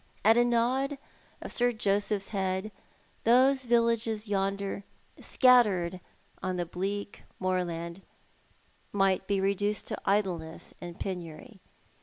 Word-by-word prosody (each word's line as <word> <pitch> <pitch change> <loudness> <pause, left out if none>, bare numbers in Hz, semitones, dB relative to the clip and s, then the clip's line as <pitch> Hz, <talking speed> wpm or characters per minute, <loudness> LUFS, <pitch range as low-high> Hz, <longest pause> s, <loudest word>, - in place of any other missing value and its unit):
At 225 +1 +7
a 240 - +5
nod 250 +4 +1 0.5
of - - -6
Sir 245 0 +2
Joseph's 205 -2 0
head, 190 +1 -2 0.5
those 260 +3 +4
villages 230 -2 +1
yonder, 200 0 -1 0.4
scattered 205 -9 +4 0.4
on 185 -1 -2
the 175 -1 -1
bleak 200 +4 -4 0.2
moorland, 175 -1 -2 0.9
might 195 -1 +1
be 200 -1 +1
reduced 200 +2 0
to - - -4
idleness 180 -5 -1
and 175 -1 -8
penury. 185 +3 -6
200 Hz, 110 wpm, -29 LUFS, 185-230 Hz, 0.9 s, At